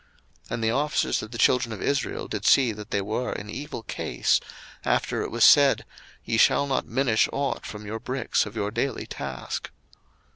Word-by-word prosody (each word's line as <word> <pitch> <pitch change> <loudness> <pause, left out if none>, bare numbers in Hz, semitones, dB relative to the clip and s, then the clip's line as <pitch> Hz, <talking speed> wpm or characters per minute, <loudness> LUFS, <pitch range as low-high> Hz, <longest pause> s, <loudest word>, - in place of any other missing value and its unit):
02:005:019 - - -19
And 115 - -4
the 110 - +2
officers 145 +5 0
of 110 - -8
the 115 - -7
children 125 0 +3
of 105 - -7
Israel 140 +2 -1
did 105 -2 -4
see 130 0 +5
that 105 0 -9
they 100 - 0
were 110 +5 -2
in 105 +1 -7
evil 135 -1 -6
case, - - 0 0.4
after - - 0
it - - -3
was - - +1
said, - - +6 0.4
Ye - - 0
shall 140 - +4
not 135 -2 -1
minish 120 -2 +2
ought 140 -1 -2
from 105 0 -8
your 110 +2 -4
bricks 130 -2 -1
of 105 - -10
your 105 -2 -2
daily 120 +5 -2
task. 65 -3 -5
115 Hz, 190 wpm, -25 LUFS, 105-130 Hz, 0.4 s, said